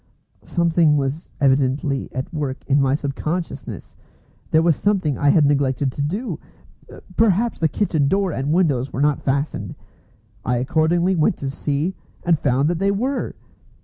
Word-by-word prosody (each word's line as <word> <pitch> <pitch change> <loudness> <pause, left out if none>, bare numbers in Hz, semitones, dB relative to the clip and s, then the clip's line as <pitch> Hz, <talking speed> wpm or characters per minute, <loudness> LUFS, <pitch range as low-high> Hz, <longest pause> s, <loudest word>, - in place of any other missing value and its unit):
Something 165 -3 +2
was 140 +3 -3
evidently 135 0 +1
at 130 +6 -5
work 145 -4 -4
in 140 +1 +3
my 135 0 +2
sub 140 -2 -3
consciousness. 165 +5 -5 0.5
There 160 +1 +3
was 165 -2 +4
something 185 -8 0
I 145 - +2
had 150 0 +5
neglected 140 -1 +1
to 145 - -5
do. 200 - -3 0.8
Perhaps 225 +1 +2
the 160 - +3
kitchen 155 -5 0
door 195 +3 +1
and 140 0 -2
windows 145 -7 +1
were 130 - -3
not 145 -1 +2
fastened. 140 +2 -2 0.7
I 125 0 0
accordingly 165 +8 +1
went 155 -3 +2
to 135 -1 -4
see, 145 +6 -2 0.3
and 170 -3 +2
found 135 +1 +2
that 170 -1 -1
they 195 +1 +2
were! 250 +8 -1
150 Hz, 155 wpm, -21 LUFS, 140-175 Hz, 0.8 s, had